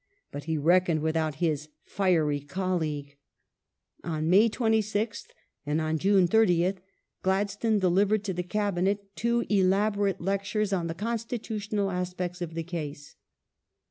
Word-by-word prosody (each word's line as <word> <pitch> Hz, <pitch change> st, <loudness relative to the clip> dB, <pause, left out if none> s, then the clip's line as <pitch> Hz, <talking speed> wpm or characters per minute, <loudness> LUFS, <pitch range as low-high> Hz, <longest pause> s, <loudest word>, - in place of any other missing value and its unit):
But 145 Hz, 0 st, -7 dB
he 160 Hz, -1 st, -1 dB
reckoned 170 Hz, +1 st, +3 dB
without 160 Hz, -1 st, 0 dB
his 155 Hz, -1 st, -1 dB
fiery 165 Hz, -7 st, +1 dB
colleague. 150 Hz, -3 st, -3 dB, 0.9 s
On 160 Hz, -1 st, -1 dB
May 210 Hz, +5 st, +6 dB
26th 220 Hz, -1 st, 0 dB, 0.4 s
and 150 Hz, +1 st, 0 dB
on 155 Hz, 0 st, -1 dB
June 190 Hz, -1 st, +4 dB
30th 185 Hz, -2 st, +3 dB, 0.4 s
Gladstone 205 Hz, +3 st, +1 dB
de 190 Hz, -2 st, +2 dB
livered 200 Hz, +4 st, +2 dB
to 195 Hz, -2 st, -2 dB
the 180 Hz, -, -2 dB
Cabinet 200 Hz, +1 st, -1 dB
two 235 Hz, +1 st, 0 dB
elaborate 200 Hz, 0 st, +2 dB
lectures 200 Hz, +2 st, -1 dB
on 175 Hz, -3 st, 0 dB
the 165 Hz, -, -4 dB
constitutional 215 Hz, -2 st, -2 dB
aspects 180 Hz, 0 st, -3 dB
of 165 Hz, -2 st, -5 dB
the 165 Hz, -, -2 dB
case. 150 Hz, -4 st, -6 dB
185 Hz, 130 wpm, -28 LUFS, 165-205 Hz, 0.9 s, May